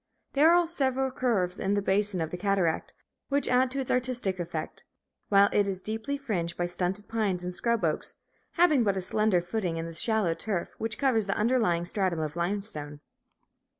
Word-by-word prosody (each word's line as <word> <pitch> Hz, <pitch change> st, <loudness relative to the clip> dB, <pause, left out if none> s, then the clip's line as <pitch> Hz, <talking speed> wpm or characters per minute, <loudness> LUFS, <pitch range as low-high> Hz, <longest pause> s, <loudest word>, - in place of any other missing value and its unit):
There 300 Hz, +4 st, +6 dB
are 350 Hz, 0 st, +5 dB
several 265 Hz, -5 st, 0 dB
curves 200 Hz, -8 st, 0 dB
in 195 Hz, +1 st, 0 dB
the 205 Hz, -, +1 dB
basin 195 Hz, -1 st, +1 dB
of 160 Hz, -, -3 dB
the 180 Hz, -, -4 dB
cataract, 190 Hz, -4 st, 0 dB, 0.3 s
which 280 Hz, 0 st, +1 dB
add 255 Hz, +1 st, +3 dB
to 275 Hz, +2 st, -2 dB
its 260 Hz, -, -3 dB
artistic 250 Hz, -7 st, -1 dB
effect, 165 Hz, -2 st, -5 dB, 0.5 s
while 200 Hz, 0 st, +6 dB
it 205 Hz, -1 st, +3 dB
is 190 Hz, -2 st, -2 dB
deeply 220 Hz, +8 st, -4 dB
fringed 180 Hz, -11 st, -3 dB
by 175 Hz, -, 0 dB
stunted 180 Hz, +3 st, -3 dB
pines 200 Hz, -6 st, 0 dB
and 180 Hz, 0 st, -4 dB
scrub 235 Hz, +4 st, 0 dB
oaks, -, -, -2 dB, 0.4 s
having 320 Hz, -7 st, +4 dB
but 200 Hz, -3 st, +1 dB
a -, -, -1 dB
slender 210 Hz, -1 st, +2 dB
footing 175 Hz, -2 st, -2 dB
in 165 Hz, -, -3 dB
the 165 Hz, -, -7 dB
shallow 210 Hz, 0 st, +1 dB
turf 190 Hz, 0 st, -3 dB
which 225 Hz, 0 st, -3 dB
covers 235 Hz, -7 st, +2 dB
the 195 Hz, -, -1 dB
underlying 210 Hz, -7 st, +2 dB
stratum 185 Hz, -3 st, 0 dB
of 155 Hz, 0 st, -3 dB
limestone. 170 Hz, -5 st, -3 dB
200 Hz, 185 wpm, -28 LUFS, 175-245 Hz, 0.5 s, There